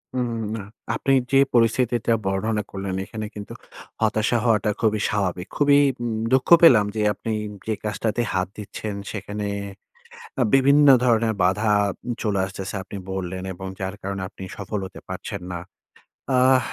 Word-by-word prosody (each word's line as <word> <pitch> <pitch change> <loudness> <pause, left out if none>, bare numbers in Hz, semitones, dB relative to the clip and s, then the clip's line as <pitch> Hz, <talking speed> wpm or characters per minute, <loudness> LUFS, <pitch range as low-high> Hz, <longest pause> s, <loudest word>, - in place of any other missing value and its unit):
হুম, 120 -2 -1 0.2
না। 110 - -4 0.3
আপনি 135 - 0 0.2
যে 135 - +5 0.2
পরিস্থিতিটা 120 0 +2
বর্ণনা 105 +2 0
করলেন, 95 -1 -4
এখানে 110 0 -6
কিন্তু 105 -1 -7 0.5
হতাশা 110 +2 +2
হওয়াটা 110 -2 +3
খুবই 110 -1 +2
স্বাভাবিক। 95 -3 -1
খুবই 145 -1 +5 0.2
উম 115 -2 -2 0.2
দুঃখ 130 - +2
পেলাম 115 -11 +8
যে, 110 - 0
আপনি 110 +3 -5 0.4
যে 110 - +1
কাজটাতে 110 +2 -1
হাত 95 -1 0
দিচ্ছেন 105 0 -6 0.2
সেখানে 105 0 -5 1.0
আ - - +5
বিভিন্ন 140 +2 +6 0.2
ধরনের 115 -2 +3
বাধা 100 +4 +2 0.4
উম 120 - -2
চলে 100 -3 0
আসতেছে। 95 0 -6
আপনি 100 - -8
বললেন 95 0 -4
এবং 95 +1 -7
যার 95 +1 -3
কারণে 100 0 -4
আপনি 95 - -11
সফল 105 0 -4
হতে 95 - -10
পারছেন - - -5
না। 85 - -4 0.8
আহ, 130 +1 +5
105 Hz, 150 wpm, -23 LUFS, 95-115 Hz, 1.0 s, পেলাম